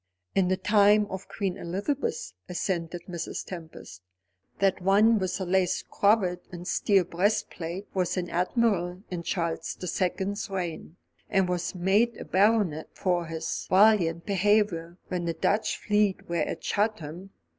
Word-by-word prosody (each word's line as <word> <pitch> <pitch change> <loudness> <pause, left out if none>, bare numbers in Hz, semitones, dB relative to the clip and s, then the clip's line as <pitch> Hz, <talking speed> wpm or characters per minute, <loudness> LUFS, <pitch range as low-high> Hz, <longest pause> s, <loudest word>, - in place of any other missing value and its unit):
"In 190 -2 +3
the 185 +1 +1
time 210 0 +4
of 190 +1 -6
Queen 195 -3 -2
Elizabeth," 190 - -3 0.2
assented 175 -1 -2
Mrs. 170 -3 -5
Tempest. 160 - -9 0.6
"That 195 -1 +1
one 210 +4 +4
with 185 -1 -1
the 190 - -3
lace 185 0 +1
cravat 195 -4 +2
and 175 0 -8
steel 195 -2 +3
breastplate 180 0 -1
was 180 -1 0
an 180 -1 -1
admiral 180 -1 0
in 175 -2 -3
Charles 170 -2 -2
the - - -5
Second's 190 +3 -2
reign, 175 -4 -4 0.3
and 195 -2 +2
was 180 +1 -2
made 200 +6 +2
a - - -7
baronet 195 -5 +2
for 175 -3 0
his 160 0 -4
valiant 185 -4 +4
behaviour 195 -4 +1
when 180 -1 -2
the 165 -1 -1
Dutch 215 +2 +1
fleet 210 -2 +1
were 170 - -2
at 155 - -2
Chatham. 195 -4 -2
185 Hz, 145 wpm, -27 LUFS, 175-205 Hz, 0.6 s, time